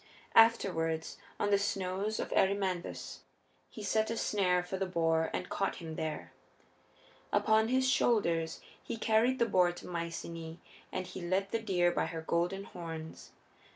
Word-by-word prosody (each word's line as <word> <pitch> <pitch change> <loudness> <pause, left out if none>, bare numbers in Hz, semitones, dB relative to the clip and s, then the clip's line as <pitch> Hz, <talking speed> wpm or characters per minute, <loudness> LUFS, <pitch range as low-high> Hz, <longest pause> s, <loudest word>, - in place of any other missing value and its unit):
Afterward, 165 -8 +4 0.3
on 205 - +1
the 200 - +5
snows 200 +1 -1
of - - -3
Erymanthus, 190 -2 0 0.5
he 215 - -9
set 220 +2 +1
a 230 - -2
snare 180 -5 +2
for 180 - -5
the 190 0 -1
boar 165 -2 +1
and - - -3
caught 195 - -1
him 165 -2 -7
there. 155 -2 -4 1.0
Upon 220 0 +3
his 260 +2 +2
shoulders 170 -11 +2 0.2
he - - -4
carried 225 +4 +3
the 235 - +3
boar 180 -5 +3
to 175 - -11
Myceaæ 165 -1 -5 0.3
and 185 - -3
he 185 - -8
led 190 +3 0
the 230 - 0
deer 180 -5 +2
by - - 0
her 165 -1 -5
golden 175 +4 0
horns. 165 -5 -8
185 Hz, 155 wpm, -32 LUFS, 170-210 Hz, 1.0 s, the